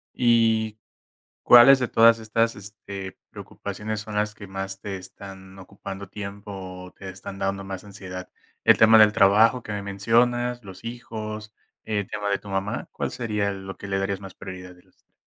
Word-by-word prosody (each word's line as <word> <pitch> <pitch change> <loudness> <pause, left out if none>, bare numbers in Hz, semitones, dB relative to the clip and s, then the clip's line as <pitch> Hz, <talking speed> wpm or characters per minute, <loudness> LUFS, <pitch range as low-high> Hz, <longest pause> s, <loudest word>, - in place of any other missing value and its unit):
¿Y, 115 -3 +3 0.7
cuáles 125 +3 +9
de 125 - 0
todas 115 +1 +5
estas, 115 +1 0
este, 100 -1 -9
preocupaciones, 110 0 -6
son 110 -1 -8
las 105 0 0
que 100 - -10
más 95 0 -5
te 100 -2 -5
están 95 0 -12
ocupando 95 0 -9
tiempo, 100 0 -7
o 95 -1 -8
te 95 - -10
están 95 +1 -8
dando 95 0 -2
más 95 -1 -7
ansiedad? 95 -3 -8 0.3
El - - +6
tema 110 0 +7
del 105 -1 +7
trabajo, 110 +5 +5
que 105 - -7
me 105 -1 -3
mencionas, 120 +5 +1
los 95 -1 -12
hijos, 110 -2 -7 0.3
el 105 -3 -2
tema 105 -1 -3
de 100 - +2
tu 100 - -12
mamá, 100 +4 -2
¿cuál - - -3
sería 105 -4 -1
lo 95 0 -8
que 100 - -9
le 95 - -1
darías 95 0 -1
más 95 -2 -11
prioridad 95 -1 -9
de 90 - -22
los - - -31
3? - - -41
100 Hz, 180 wpm, -25 LUFS, 95-110 Hz, 0.7 s, cuáles